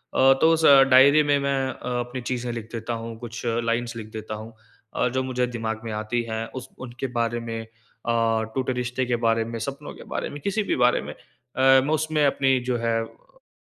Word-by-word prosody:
अ, 135 +1 +6
तो 160 - +6
उस 160 0 +2 0.3
डायरी 140 +4 +7
में 145 -1 +3
मैं 140 0 0
अ, 125 -1 -4
अपनी 120 +1 -4
चीज़ें 125 0 -3
लिख 115 -1 -7
देता 115 +1 -4
हूँ, 115 0 -7
कुछ 115 0 -7
लाइन्स 115 0 -1
लिख 110 -2 -7
देता 110 0 -5
हूँ 110 +2 -9 0.4
अ, - - +2
जो 130 +1 -1
मुझे 125 -1 -1
दिमाग 110 -2 -4
में 115 - -4
आती 110 +3 -1
हैं। 110 0 -2 0.2
उस - - -13 0.2
उनके 120 +3 -5
बारे 115 0 0
में 115 -1 -5
अ, - - -16 0.9
टूटे 130 -1 0
रिश्ते 125 +1 -2
के 120 -1 0
बारे 115 0 +2
में, 115 0 -5
सपनों 140 +5 -6
के - - -12
बारे - - -2
में, 145 - -8
किसी 200 +6 -1
भी - - -1
बारे 125 - +3
में। - - -7
अ, - - -23 0.7
मैं 150 +3 0
उसमें 155 -1 +1
अपनी 135 -1 +2
जो 120 - +1
है 115 -1 0
अ, - - -19
120 Hz, 215 wpm, -24 LUFS, 115-135 Hz, 0.9 s, डायरी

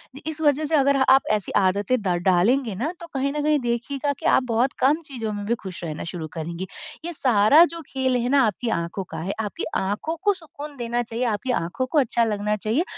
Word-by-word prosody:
इ 275 - -8
इस 315 0 -4
वजह 295 0 +3
से 315 - +1
अगर 280 -1 +4
अ 265 - +3
आप 270 - +6
ऐसी 210 -2 -1
आदतें 200 +6 +2
द 200 - -4 0.2
डालेंगे 210 +5 +3
ना 275 - -2
तो 340 - -9
कहीं 275 0 0
न 300 - -1
कहीं 300 -1 +3
देखिएगा 260 +4 -2
कि - - -9
आप 260 - +4
बहुत 245 +4 +2
कम 290 +5 +3
चीज़ों 230 -6 -4
में 205 0 -5
भी 235 +3 +1
खुश 185 -3 -7
रहना 155 -2 -4
शुरू 165 -3 -5
करेंगी। 170 +3 -5 0.4
ये 345 - -4
सारा 255 +2 +5
जो 335 - -6
खेल 260 -1 0
है 245 0 0
ना 280 0 +5
आपकी 225 +3 -2
आँखों 170 +1 -2
का - - -6
है, 185 +5 -3
आपकी 210 -2 -3
आँखों 210 +12 -1
को 410 -1 +4
सुकून 300 -4 -10
देना 240 0 -1
चाहिए, 235 +1 -4
आपकी 235 +3 -1
आँखों 175 +10 -2
को 295 +3 +2
अच्छा 235 -2 +2
लगना 210 -1 0
चाहिए 220 - 0
240 Hz, 230 wpm, -24 LUFS, 205-280 Hz, 0.4 s, आप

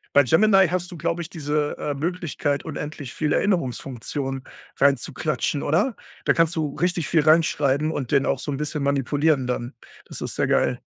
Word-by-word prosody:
Bei 145 - +8
Gemini 195 - +5
hast 180 +1 -2
du 175 - -8
glaube 170 +2 -1
ich 165 - -7
diese, 150 -4 -2
äh, 145 - -2
Möglichkeit, 150 -2 -2
unendlich 150 -4 -6
viele 150 -2 +1
Erinnerungsfunktionen 135 - -2 0.3
reinzuklatschen 140 +1 0
oder? 200 - +1 0.3
Da - - +4
kannst 165 0 +2
du 150 -3 -2
richtig 175 -2 0
viel 160 - +3
reinschreiben 155 -2 +3
und 135 -6 -4
den 140 -1 +3
auch 135 - 0
so 145 - -4
'n 135 - -2
bisschen 150 0 -3
manipulieren 140 0 +1
dann. 125 0 -3 0.3
Das - - -7
ist - - -4
sehr - - +1
geil. - - +1
150 Hz, 175 wpm, -23 LUFS, 140-165 Hz, 0.3 s, Bei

